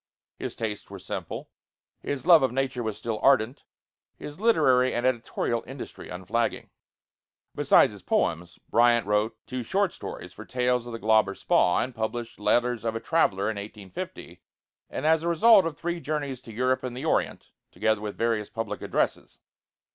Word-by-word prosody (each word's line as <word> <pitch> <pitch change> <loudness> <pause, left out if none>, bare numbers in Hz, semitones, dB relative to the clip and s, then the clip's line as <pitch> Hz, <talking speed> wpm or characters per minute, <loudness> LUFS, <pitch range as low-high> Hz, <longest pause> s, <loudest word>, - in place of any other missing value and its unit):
His - - -5
tastes 105 -2 -4
were - - -8
simple, - - -6 0.5
his 140 0 -4
love 170 -2 +8
of 130 - +2
nature 130 -1 -1
was 110 -3 -3
still 115 -2 -3
ardent; 130 0 +3 0.5
his 150 +3 -9
literary 135 - +3
and 120 +1 -1
editorial 120 -1 -1
industry 135 +1 -9
unflagging. 95 +6 -2 0.8
Besides - - +4
his - - -12
poems, 85 +2 -1
Bryant 120 -1 +4
wrote 105 +2 0
two 130 -1 -4
short 195 - 0
stories - - -8
for - - -10
'Tales 125 -1 0
of 120 - -7
the - - -3
Glauber 110 -3 +3
Spa'; 90 - +2
and 130 - -6
published 115 0 -4
'Letters 120 +2 +1
of 115 -1 -2
a - - -1
Traveler' 110 -9 +1
in 110 - -7
1850, 100 -2 -8 0.5
as 160 +2 +2
a 170 - -3
result 190 +2 +6
of 155 -3 -6
three 170 +1 -3
journeys 145 -5 -3
to 120 - -11
Europe 130 +3 +1
and 125 -1 -5
the 135 - -5
Orient, - - -1 0.2
together 110 -1 0
with 105 -1 -5
various 115 -3 0
public 115 -2 -4
addresses. - - -2
120 Hz, 165 wpm, -26 LUFS, 110-135 Hz, 0.8 s, love